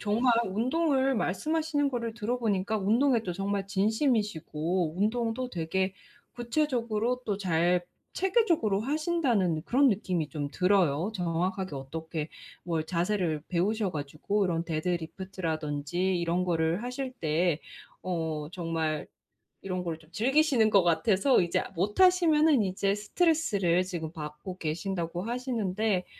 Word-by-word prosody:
정말 230 +4 +2
운동을 265 - +1
말씀하시는 295 - 0
거를 235 -2 -3
들어 235 +2 -2
보니까 210 -2 0
운동에 230 +5 +2
또 180 -5 -3
정말 195 +1 -2
진심이시고 190 - 0
운동도 230 +3 0
되게 190 +1 -1 0.4
구체적으로 240 -2 -1
또 205 -2 -1
잘 175 -1 +2 0.3
체계적으로 350 - +2
하신다는 260 - +1
그런 270 +2 +4
느낌이 180 -7 -1
좀 145 -2 -3
들어요. 180 0 +2
정확하게 180 -1 -1
어떻게 160 +3 -5 0.4
뭘 165 -3 -1
자세를 170 -3 -1
배우셔 195 +3 0
가지고 155 +8 -1
이런 165 -1 -1
데드리프트라든지 170 0 -2
이런 170 +1 0
거를 170 +2 0
하실 255 +1 -4
때 165 - 0 0.5
어 160 -4 -2
정말 165 -3 -2 0.6
이런 185 -1 -3
거를 165 -2 -3
좀 160 +1 -21
즐기시는 260 - +3
것 195 -3 +5
같아서 195 - +3
이제 170 -1 0
못 195 - -1
하시면은 320 - +5
이제 195 +1 0
스트레스를 210 - +1
지금 165 -4 -5
받고 155 +4 -7
계신다고 170 +2 -3
하시는데 220 -5 -1
190 Hz, 305 characters per minute, -29 LUFS, 170-235 Hz, 0.6 s, 것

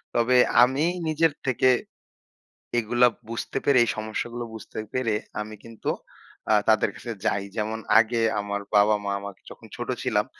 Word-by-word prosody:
তবে 120 +2 +3 0.3
আমি 135 +5 +2 0.2
নিজের 160 -1 +2
থেকে 130 0 +3 1.1
এগুলা 120 +2 +3 0.2
বুঝতে 115 +3 -4
পেরে 140 -2 +4
এই 115 - -1
সমস্যাগুলো 115 +2 -4
বুঝতে 110 - -8
পেরে, 115 -4 0 0.3
আমি 110 0 -7
কিন্তু 115 -1 -6 0.6
আ - - +6 0.2
তাদের 110 - +4
কাছে 120 - -7
যাই। 100 - +1
যেমন 110 +1 -2 0.2
আগে 115 +1 +1 0.2
আমার 100 0 -3
বাবা-মা 105 0 +3
আমাকে 100 -2 -9
যখন - - -13
ছোট - - -6
ছিলাম - - +1
115 Hz, 145 wpm, -25 LUFS, 105-125 Hz, 1.1 s, আ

